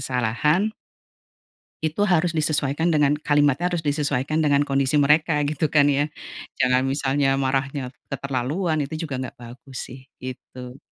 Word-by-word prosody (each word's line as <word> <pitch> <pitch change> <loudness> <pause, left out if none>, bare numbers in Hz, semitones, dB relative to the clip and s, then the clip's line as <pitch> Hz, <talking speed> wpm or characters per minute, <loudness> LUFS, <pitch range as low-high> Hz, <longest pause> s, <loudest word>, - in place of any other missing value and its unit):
kesalahan 130 - +1 1.1
itu 160 +6 -1
harus 175 -2 +2
disesuaikan 155 +1 +1
dengan 150 0 +3
kalimatnya 145 +2 +2
harus 170 -2 -1
disesuaikan 145 0 0
dengan 145 -1 +3
kondisi 135 0 0
mereka 150 +2 +3
gitu 155 +2 0
kan 145 -1 +4
ya, 145 +1 +1 0.5
jangan 130 0 +4
misalnya 135 0 +1
marahnya 135 0 -1 0.2
keterlaluan 140 +5 -2
itu 155 +4 -5
juga 130 -2 -3
nggak 130 - -6
bagus 125 +2 -10
sih 130 +2 -10 0.2
gitu. 125 0 -8
140 Hz, 130 wpm, -23 LUFS, 130-155 Hz, 1.1 s, kan